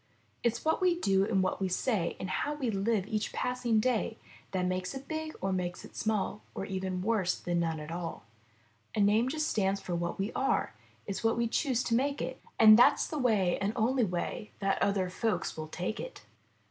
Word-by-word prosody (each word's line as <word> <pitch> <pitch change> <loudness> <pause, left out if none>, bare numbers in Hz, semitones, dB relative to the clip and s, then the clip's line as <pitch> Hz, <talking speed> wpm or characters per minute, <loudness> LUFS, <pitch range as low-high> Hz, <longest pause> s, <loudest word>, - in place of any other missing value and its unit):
It's 235 +4 0
what 320 +3 +2
we 355 -2 +3
do 195 - +3
and 195 -4 +2
what 185 - -1
we 190 - +2
say 185 -1 0
And 190 - -3
How 295 +10 -1
we 260 -6 -1
live 200 0 +1
each 215 0 -2
passing 250 -3 0
day 225 -1 0 0.3
That 185 -1 -1
makes 185 +4 -2
it 270 +1 -8
big 315 0 -4
or 195 0 0
makes 180 -1 -3
it - - -15
small 210 -1 -1
Or 195 - -3
even 185 -1 -3
worse 210 -4 +1
than 175 -1 -1
none 165 -2 -1
at 150 +1 -7
alL 170 -1 -5 0.7
A - - 0
name 210 +5 +4
just 305 +2 -1
stands 195 -6 +1
for 180 - -5
what 170 0 -2
we 195 +3 -1
are; 265 - 0 0.3
It's 200 +1 -4
what 225 0 +2
we 235 0 +2
choose 255 0 +1
to 230 - -1
make 275 +4 +1
it. - - -4 0.2
And 220 0 +9
that's 280 +3 +6
the 305 - -4
way 210 -8 +2
and 200 +2 0
only 245 +2 +2
way 195 +3 -2
That 195 -1 0
other 200 -2 +2
folks 220 +3 -1
will 155 0 -5
take 180 +7 -4
it.' - - -7
210 Hz, 210 wpm, -31 LUFS, 185-245 Hz, 0.7 s, And